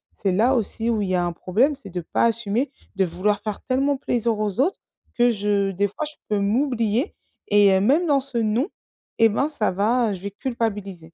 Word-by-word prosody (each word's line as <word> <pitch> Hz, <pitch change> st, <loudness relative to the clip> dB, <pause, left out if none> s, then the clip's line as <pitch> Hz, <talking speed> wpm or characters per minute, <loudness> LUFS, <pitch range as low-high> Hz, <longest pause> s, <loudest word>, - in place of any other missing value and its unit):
C'est 195 Hz, -, -1 dB
là, 230 Hz, +8 st, +3 dB
aussi 230 Hz, 0 st, -1 dB
où 225 Hz, -3 st, +1 dB
il 195 Hz, -, -2 dB
y 185 Hz, -, +1 dB
a 175 Hz, -, +1 dB
un 175 Hz, -, -2 dB
problème, 225 Hz, -, +1 dB
c'est 215 Hz, -7 st, -12 dB
de 180 Hz, -1 st, -4 dB
pas 165 Hz, -, -1 dB
assumer, 230 Hz, +3 st, 0 dB, 0.2 s
de 190 Hz, -1 st, +2 dB
vouloir 195 Hz, +4 st, -1 dB
faire 210 Hz, -1 st, -4 dB
tellement 275 Hz, +2 st, +1 dB
plaisir 235 Hz, -4 st, -1 dB
aux 210 Hz, 0 st, -2 dB
autres 355 Hz, +8 st, 0 dB, 0.3 s
que 240 Hz, 0 st, +3 dB
je 200 Hz, -2 st, 0 dB
des 200 Hz, +2 st, +1 dB
fois, 255 Hz, +10 st, -5 dB
je 300 Hz, 0 st, -9 dB
peux 210 Hz, -1 st, +1 dB
m'oublier 230 Hz, -, 0 dB, 0.4 s
et 205 Hz, 0 st, +6 dB
hem, 190 Hz, 0 st, +3 dB
même 310 Hz, +9 st, +3 dB
dans 285 Hz, -2 st, +4 dB
ce 270 Hz, -2 st, -6 dB
non, 230 Hz, +6 st, +1 dB, 0.5 s
eh 225 Hz, 0 st, +6 dB
ben, 275 Hz, +8 st, 0 dB
ça 240 Hz, -8 st, 0 dB
va, 220 Hz, +5 st, +1 dB
heu, -, -, -1 dB
je 180 Hz, -, -11 dB
vais 200 Hz, +1 st, -5 dB
culpabiliser. 205 Hz, -, -4 dB
215 Hz, 220 wpm, -23 LUFS, 200-250 Hz, 0.5 s, et